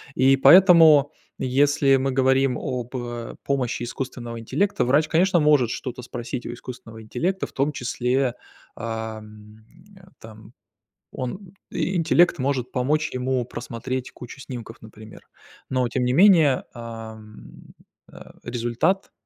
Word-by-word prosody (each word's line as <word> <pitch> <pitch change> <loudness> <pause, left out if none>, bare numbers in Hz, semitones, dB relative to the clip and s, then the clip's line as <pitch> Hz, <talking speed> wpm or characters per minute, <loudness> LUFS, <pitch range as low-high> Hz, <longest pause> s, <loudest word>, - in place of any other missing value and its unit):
И 135 +1 +4
поэтому, 160 -1 +7 0.3
если 135 +1 +2
мы 135 0 -1
говорим 130 0 +2
об 125 -1 -5 0.5
помощи 130 -3 -2
искусственного 120 -1 -6
интеллекта, 195 - -1
врач, 150 +5 +2
конечно, 175 +2 +3
может 145 -6 +3
что-то 125 0 -6
спросить 120 0 -6
у 120 - -5
искусственного 120 -2 -10
интеллекта, 180 - -2
в - - -19
том 145 +2 -1
числе, 125 +1 -1 0.4
ам, 110 -1 -7 0.6
там, 110 0 -14 0.6
он 180 +9 -7 0.2
интеллект 175 -1 +2
может 130 -2 -2
помочь 150 +5 0
ему 130 0 -1
просмотреть 125 +2 -6
кучу 125 +3 -11
снимков, 120 -4 -9
например, 110 0 -13 0.5
но, 130 -2 0
тем 125 +2 -2
не 125 - +1
менее, 165 -5 +5
ам, 110 -2 -11 0.5
э, - - -13
результат, 120 +11 -1
130 Hz, 120 wpm, -23 LUFS, 120-145 Hz, 0.6 s, поэтому